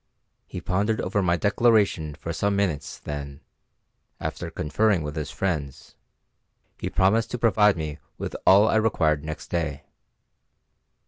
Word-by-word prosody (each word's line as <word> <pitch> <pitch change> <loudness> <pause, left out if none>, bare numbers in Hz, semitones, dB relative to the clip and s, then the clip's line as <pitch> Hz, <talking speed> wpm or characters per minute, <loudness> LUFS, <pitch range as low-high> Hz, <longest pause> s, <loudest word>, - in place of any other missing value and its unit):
He - - -7
pondered 105 +4 0
over 100 +2 0
my 85 -2 +2
declaration 100 -7 +2
for 85 +2 -5
some 100 +4 0
minutes, 95 -7 -1
then, 70 -1 -7 0.8
after - - -4
conferring 95 +3 +1
with 75 0 -5
his 75 -3 -3
friends, 75 -8 -4 0.8
he - - -3
promised 110 +4 +2
to 125 - -3
provide 105 -4 +4
me 75 -2 -5 0.2
with - - -5
all 100 +3 +6
I 110 - +3
required 80 -9 +2
next 80 0 -7
day. 80 -5 -2
90 Hz, 135 wpm, -25 LUFS, 75-105 Hz, 0.8 s, all